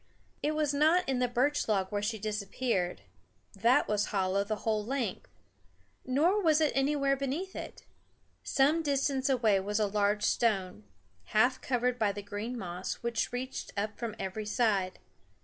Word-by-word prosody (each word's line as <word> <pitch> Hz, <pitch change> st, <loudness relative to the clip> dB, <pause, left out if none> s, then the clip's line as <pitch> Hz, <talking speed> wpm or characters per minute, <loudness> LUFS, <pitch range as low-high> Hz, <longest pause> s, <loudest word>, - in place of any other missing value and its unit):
It 305 Hz, +1 st, 0 dB
was 300 Hz, -2 st, +1 dB
not 315 Hz, +5 st, +3 dB
in 265 Hz, -2 st, 0 dB
the 250 Hz, -, +2 dB
birch 260 Hz, +5 st, +1 dB
log 195 Hz, -3 st, 0 dB
where 205 Hz, 0 st, -1 dB
she 220 Hz, +2 st, -1 dB
disappeared 205 Hz, -, -2 dB, 0.5 s
that 230 Hz, +6 st, +3 dB
was 210 Hz, -1 st, +1 dB
hollow 195 Hz, -1 st, +1 dB
the 215 Hz, +2 st, -2 dB
whole 215 Hz, -2 st, +1 dB
length 240 Hz, -3 st, -3 dB, 0.8 s
nor 330 Hz, +11 st, +3 dB
was 315 Hz, -4 st, +4 dB
it 310 Hz, -2 st, +3 dB
anywhere 275 Hz, 0 st, +2 dB
beneath 275 Hz, +8 st, -3 dB
it. -, -, -8 dB, 0.6 s
Some 295 Hz, +5 st, +3 dB
distance 275 Hz, -2 st, 0 dB
away 225 Hz, -7 st, +3 dB
was 205 Hz, +3 st, -1 dB
a 215 Hz, -, +3 dB
large 205 Hz, +1 st, +1 dB
stone, 190 Hz, -, 0 dB, 0.5 s
half 255 Hz, +4 st, +4 dB
covered 250 Hz, -1 st, 0 dB
by 210 Hz, -3 st, +2 dB
the 205 Hz, 0 st, -6 dB
green 210 Hz, +5 st, -5 dB
moss 180 Hz, -3 st, -4 dB
which 235 Hz, -1 st, -1 dB
reached 255 Hz, +2 st, -5 dB
up 210 Hz, +1 st, -3 dB
from 230 Hz, -2 st, -4 dB
every 210 Hz, +3 st, -4 dB
side. 205 Hz, -5 st, +1 dB
230 Hz, 160 wpm, -30 LUFS, 205-270 Hz, 0.8 s, was